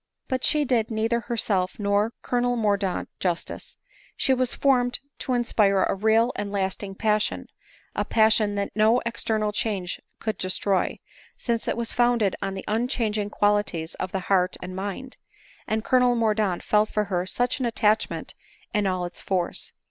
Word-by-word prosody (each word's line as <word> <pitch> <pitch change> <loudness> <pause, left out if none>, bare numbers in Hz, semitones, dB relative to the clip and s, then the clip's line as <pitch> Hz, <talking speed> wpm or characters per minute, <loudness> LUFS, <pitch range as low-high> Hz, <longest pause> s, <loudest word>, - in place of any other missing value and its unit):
But 260 -1 -2
she 300 -1 +3
did 235 -4 +1
neither 225 +1 0
herself 205 -6 -1
nor 205 +1 +1
Colonel 245 0 +1
Mordaunt 200 -4 0
jus 175 -2 0
tice. - - -8 0.4
She 265 - +3
was 255 -1 0
formed 250 -3 +2 0.2
to 255 - -2
inspire 205 -5 +3
a - - +1
real 220 +4 +3
and 205 -1 -3
lasting 195 0 -2
passion 215 0 0 0.3
— - - -30
a - - +1
passion 220 -2 +3
that 200 0 -2
no 220 +3 +4
external 220 -2 -1
change 200 -4 -2 0.2
could 220 -1 -3
destroy 185 +1 0 0.2
— - - -23
since 235 -2 -2
it - - 0
was 235 -1 -2
founded 240 -5 +2
on 195 - -2
the 190 - -6
unchanging 220 -2 0
qualities 205 -6 0
of 185 - -3
the 190 - -2
heart 185 -1 +1
and 185 +1 -7
mind; 205 +7 -5 0.5
and 220 0 -1
Colonel 250 -1 +3
Mordaunt 215 -5 +1
felt 210 0 +3
for 210 - 0
her 185 -3 -2
such 245 +7 0
an 255 - 0
attachment 220 -2 0 0.4
in 205 -2 +2
all 185 -1 -1
its 175 0 -7
force. 180 -3 -2
215 Hz, 170 wpm, -25 LUFS, 195-235 Hz, 0.5 s, no